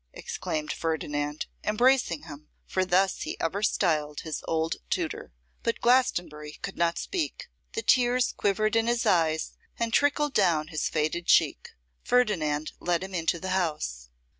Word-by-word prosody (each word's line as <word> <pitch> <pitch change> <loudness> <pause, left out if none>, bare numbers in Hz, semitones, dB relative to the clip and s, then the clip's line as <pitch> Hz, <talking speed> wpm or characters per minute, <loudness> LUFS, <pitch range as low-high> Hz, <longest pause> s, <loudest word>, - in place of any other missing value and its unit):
exclaimed 155 -1 -4
Ferdinand, 150 -2 -2 0.2
embracing 215 - +2
him, 150 -2 -11 0.2
for 185 - 0
thus 185 +1 +2
he - - -4
ever 180 +5 -1
styled 155 -8 +1
his 160 -2 -5
old 160 0 0
tutor. - - -2 0.3
But 230 -1 -1
Glastonbury 175 -12 +1
could 195 - -4
not 170 0 +1
speak; 345 -6 -3 0.2
the 445 - -3
tears 250 0 +3
quivered 215 +2 0
in 225 0 +2
his 240 0 +1
eyes 160 -2 +2 0.2
and 230 -1 -1
trickled 290 0 +2
down 165 -8 +2
his 155 -2 -1
faded 160 +3 -1
cheek. - - +3 0.3
Ferdinand 160 -12 +1
led 175 0 0
him 190 0 -7
into 170 -1 0
the 190 - -5
house. 150 - -2
175 Hz, 145 wpm, -27 LUFS, 155-225 Hz, 0.3 s, tears